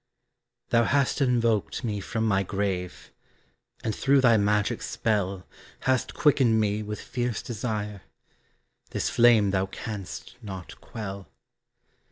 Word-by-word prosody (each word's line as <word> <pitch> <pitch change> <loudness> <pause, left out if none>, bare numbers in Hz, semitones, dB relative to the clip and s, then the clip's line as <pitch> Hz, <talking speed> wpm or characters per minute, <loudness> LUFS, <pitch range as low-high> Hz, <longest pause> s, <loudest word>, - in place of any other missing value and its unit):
Thou 115 0 +4
hast 140 +1 +1
invoked 115 -4 +1
me 105 -4 -2
from 110 +3 -2
my 100 -3 +2
grave, 95 -2 -3 0.7
And 110 - -1
through 140 0 +3
thy 120 -3 +6
magic 105 -1 +1
spell 100 -4 -1 0.4
Hast 130 -1 0
quickened 130 -6 +4
me 105 0 +1
with 105 0 -5
fierce 120 -3 -3
desire, 105 -3 -4 0.9
This - - -2
flame 115 -4 +5
thou 95 0 +1
canst 105 +3 -7
not 95 -5 -8
quell. 100 -3 -7
105 Hz, 120 wpm, -27 LUFS, 100-120 Hz, 0.9 s, thy